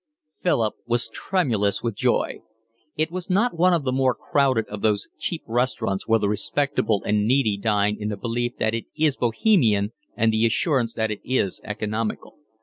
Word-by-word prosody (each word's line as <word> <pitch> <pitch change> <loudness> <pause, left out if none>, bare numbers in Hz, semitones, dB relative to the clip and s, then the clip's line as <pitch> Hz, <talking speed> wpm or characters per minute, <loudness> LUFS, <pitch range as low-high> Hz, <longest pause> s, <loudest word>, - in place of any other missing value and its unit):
Philip 115 -11 +1
was 120 0 0
tremulous 115 - 0
with 115 -2 -1
joy. - - 0 0.6
It 155 +2 0
was 185 +1 -5
not 205 +5 +2
one 180 +2 +5
of 170 -4 +2
the 130 - 0
more 130 -1 +2
crowded 130 -6 +1
of 105 -1 -7
those 105 -2 +1
cheap 170 - -3
restaurants 115 -4 -1
where 115 0 +4
the 100 - 0
respectable 110 0 0
and 105 0 +1
needy 125 -4 +3
dine 105 0 +1
in 105 0 -3
the 105 - -3
belief 120 +2 -2
that 110 - 0
it 115 - -3
is 155 -3 +2
bohemian 115 - +2 0.3
and 110 0 +3
the 110 +1 +3
assurance 120 0 0
that 110 -1 0
it 105 - -5
is 125 -8 -1
economical. 110 +3 -4
115 Hz, 175 wpm, -24 LUFS, 105-135 Hz, 0.6 s, one